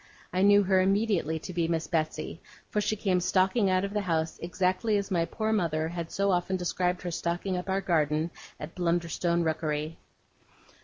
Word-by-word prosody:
I 185 Hz, -, +1 dB
knew 205 Hz, +1 st, +6 dB
her 190 Hz, -1 st, +3 dB
immediately 195 Hz, -5 st, +1 dB
to 180 Hz, +4 st, -7 dB
be 170 Hz, -1 st, 0 dB
Miss 165 Hz, -1 st, -1 dB
Betsey, 155 Hz, -1 st, -2 dB, 0.3 s
for 210 Hz, -, +1 dB
she 215 Hz, -, 0 dB
came 190 Hz, -3 st, +1 dB
stalking 190 Hz, +4 st, +2 dB
out 185 Hz, +1 st, +2 dB
of 200 Hz, -, -6 dB
the 210 Hz, -, 0 dB
house 160 Hz, -4 st, -1 dB
exactly 185 Hz, +5 st, +1 dB
as 200 Hz, 0 st, -3 dB
my 170 Hz, -2 st, +2 dB
poor 220 Hz, +4 st, -1 dB
mother 160 Hz, -6 st, 0 dB
had 170 Hz, -1 st, -5 dB
so 200 Hz, 0 st, +1 dB
often 180 Hz, +1 st, 0 dB
described 180 Hz, 0 st, -1 dB
her 175 Hz, -, -3 dB
stalking 175 Hz, +3 st, -2 dB
up 180 Hz, +2 st, -4 dB
our 190 Hz, +1 st, +1 dB
garden 160 Hz, -2 st, +1 dB, 0.3 s
at 150 Hz, +2 st, -7 dB
Blunderstone 170 Hz, 0 st, 0 dB
Rookery. 155 Hz, 0 st, -2 dB
180 Hz, 185 wpm, -28 LUFS, 165-195 Hz, 0.3 s, knew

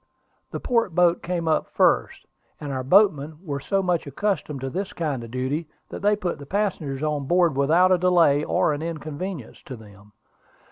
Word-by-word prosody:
The -, -, -5 dB
port 230 Hz, -8 st, 0 dB
boat 175 Hz, -1 st, +3 dB
came 175 Hz, -2 st, -3 dB
up 160 Hz, -, +1 dB
first; -, -, +1 dB, 0.3 s
and 145 Hz, -2 st, -5 dB
our 130 Hz, -1 st, -3 dB
boatmen 155 Hz, -2 st, +3 dB
were 145 Hz, -5 st, -4 dB
so 195 Hz, +7 st, -1 dB
much 175 Hz, -4 st, 0 dB
accustomed 150 Hz, -2 st, -2 dB
to 135 Hz, -, -3 dB
this 195 Hz, +5 st, -4 dB
kind 145 Hz, -7 st, -3 dB
of 115 Hz, -, -9 dB
duty, 130 Hz, +6 st, -3 dB, 0.2 s
that -, -, -7 dB
they 205 Hz, +1 st, +3 dB
put 185 Hz, -7 st, -4 dB
the 140 Hz, -, -10 dB
passengers 160 Hz, -9 st, -2 dB
on 150 Hz, -3 st, -2 dB
board 175 Hz, -3 st, +3 dB
without 160 Hz, +7 st, +4 dB
delay 170 Hz, -5 st, +4 dB
or 155 Hz, -, +1 dB
inconvenience 155 Hz, -, -6 dB
to 130 Hz, -, -9 dB
them. 105 Hz, -2 st, -16 dB
155 Hz, 175 wpm, -24 LUFS, 140-180 Hz, 0.3 s, without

